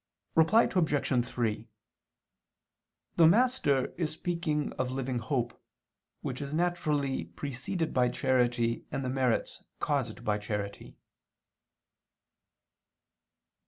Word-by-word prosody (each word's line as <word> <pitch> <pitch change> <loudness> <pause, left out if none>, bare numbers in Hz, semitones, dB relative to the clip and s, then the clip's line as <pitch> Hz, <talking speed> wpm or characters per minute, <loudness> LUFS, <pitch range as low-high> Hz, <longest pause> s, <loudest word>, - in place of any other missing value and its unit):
Reply 165 +8 +5
Obj. 145 -8 +1
3: 115 -4 -2 1.5
The 165 -2 +8
Master 200 - +3
is 165 -3 +1
speaking 160 -2 -2
of 130 0 -2
living 130 -1 -2
hope, 120 0 -2 0.6
which 130 +1 -4
is 140 +1 -4
naturally 150 - 0
preceded 140 - -3
by 125 -1 +3
charity 120 -3 +1
and 135 - -2
the - - -1
merits 130 -2 0 0.2
caused 135 -6 -1
by 105 0 +1
charity. 105 -1 -5
135 Hz, 95 wpm, -30 LUFS, 120-160 Hz, 1.5 s, The